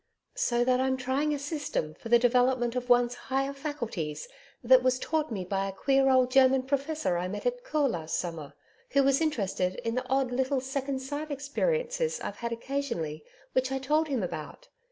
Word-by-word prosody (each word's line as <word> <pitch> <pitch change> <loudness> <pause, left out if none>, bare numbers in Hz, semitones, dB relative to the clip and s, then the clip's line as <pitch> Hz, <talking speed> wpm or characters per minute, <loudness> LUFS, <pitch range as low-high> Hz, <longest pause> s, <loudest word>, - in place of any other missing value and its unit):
So 240 - +2
that 255 0 +2
I'm 260 0 +1
trying 265 +4 0
a 295 - 0
system 285 - -3
for 230 - -10
the 240 - +7
development 245 0 +2
of 250 0 -3
one's 245 0 +4 0.2
higher 270 +1 0
faculties 235 - -4 0.4
that 255 +1 +7
was 255 0 +2
taught 310 +1 -1
me 190 -4 -3
by 195 +1 -1
a - - -3
queer 270 +7 +2
old 255 -1 +4
German 265 0 +5
professor 280 - -1
I 180 - -2
met 200 +3 -6
at - - -1
Caux 305 -12 +1
last 165 -4 -3
summer, 160 -5 -5 0.4
who 280 0 +5
was 275 +2 +3
interested 195 - 0
in 230 - 0
the 255 +1 -2
odd 265 -1 +1
little 265 +2 +1
second 265 +1 -3
sight 290 +3 -4
experiences 475 - -1
I've 205 - -5
had 235 -1 -4
occasionally 230 - -3 0.3
which 260 0 +1
I 270 - 0
told 300 +4 +1
him 265 -8 -1
about. 155 -4 -6
260 Hz, 190 wpm, -29 LUFS, 230-280 Hz, 0.4 s, the